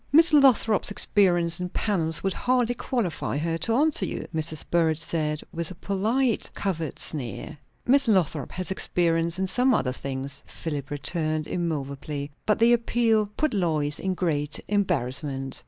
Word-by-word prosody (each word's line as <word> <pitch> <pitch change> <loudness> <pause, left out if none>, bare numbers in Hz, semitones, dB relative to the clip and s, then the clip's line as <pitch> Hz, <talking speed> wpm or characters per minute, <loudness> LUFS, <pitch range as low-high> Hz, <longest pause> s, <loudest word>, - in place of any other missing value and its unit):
"Miss 325 +3 +6
Lothrop's 255 -7 +4
experience 175 -5 +2
in 180 0 -3
panels 170 -6 0
would 195 -1 0
hardly 245 +1 +1
qualify 230 - -2
her 165 +2 -1
to 225 +8 +1
answer 295 -4 +2
you," - - -3
Mrs. 155 -1 0
Burrage 165 -2 +2
said, 155 -2 -1
with 170 -1 -3
a 185 - -9
polite 220 +7 0
covert 165 -5 -3
sneer. 135 +1 -4 0.3
"Miss 275 +2 +4
Lothrop 170 - +1
has 185 +1 -2
experience 170 -2 +2
in 190 - 0
some 250 +6 +2
other 130 -9 0
things," 135 +1 -5
Philip 145 -4 -5
returned 155 +2 -2
immoveably. 145 -3 -4 0.2
But 210 - +3
the 235 +1 +5
appeal 225 -2 +2
put 310 -3 +1
Lois 155 -7 0
in 190 -1 -2
great 150 -5 -1
embarrassment. 135 -8 -1
170 Hz, 150 wpm, -25 LUFS, 150-215 Hz, 0.3 s, Miss